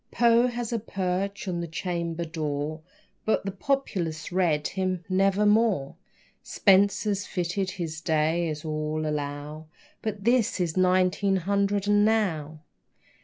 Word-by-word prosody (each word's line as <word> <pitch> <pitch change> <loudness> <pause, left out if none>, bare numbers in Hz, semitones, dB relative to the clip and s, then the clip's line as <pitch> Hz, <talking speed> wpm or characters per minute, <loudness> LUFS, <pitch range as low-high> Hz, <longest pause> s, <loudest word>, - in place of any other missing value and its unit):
Poe 235 +1 +4
has 240 -1 -3
a 230 - 0
perch 195 0 -3
on 175 -2 -2
the 170 - -4
chamber 170 0 -3
door, 155 -1 -3 0.4
But 220 - 0
the 195 - -2
populace 190 - -2
read 170 -5 +1
him 185 -2 -2
"Nevermore." 195 -3 +2 0.5
Spenser 200 +1 +3
fitted 190 -1 -2
his 165 -4 -5
day, 160 +1 +1
as 155 0 -5
all 155 0 -2
allow, 150 +1 -4 0.3
But 210 -3 -4
this 235 -2 +2
is 170 -3 -1
nineteen 185 +1 +2
hundred 200 +2 0
and 205 0 +4
now. 165 -9 0
185 Hz, 125 wpm, -26 LUFS, 160-200 Hz, 0.5 s, Poe